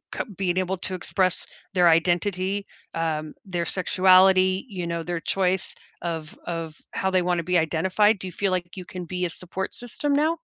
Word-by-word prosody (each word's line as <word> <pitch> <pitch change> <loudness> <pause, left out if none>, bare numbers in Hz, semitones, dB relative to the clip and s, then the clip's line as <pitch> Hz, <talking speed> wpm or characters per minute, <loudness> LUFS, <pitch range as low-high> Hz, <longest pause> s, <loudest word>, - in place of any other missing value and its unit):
c - - -1 0.2
being 185 -2 0
able 185 +1 0
to 185 +1 -2
express 185 +1 0 0.3
their 175 -2 +5
identity, 185 +4 +1 0.3
um, 155 -2 -2
their 175 -3 -2
sexuality, 185 +2 +4
you 180 -4 -4
know, 170 -1 -2
their 175 -1 -3
choice 185 +1 0 0.3
of 165 -2 -4
of 165 -2 -4 0.2
how 190 - 0
they 185 -1 +3
wanna 175 -1 0
be 180 +1 +2
identified? 185 +6 +3
Do 190 - -5
you 180 - -6
feel 195 +2 -1
like 180 +1 -3
you 185 - -6
can 180 0 -7
be 180 +1 -2
a 175 - -1
support 185 +3 -5
system 245 +4 -2
now? 310 +4 +2
180 Hz, 185 wpm, -25 LUFS, 170-190 Hz, 0.3 s, their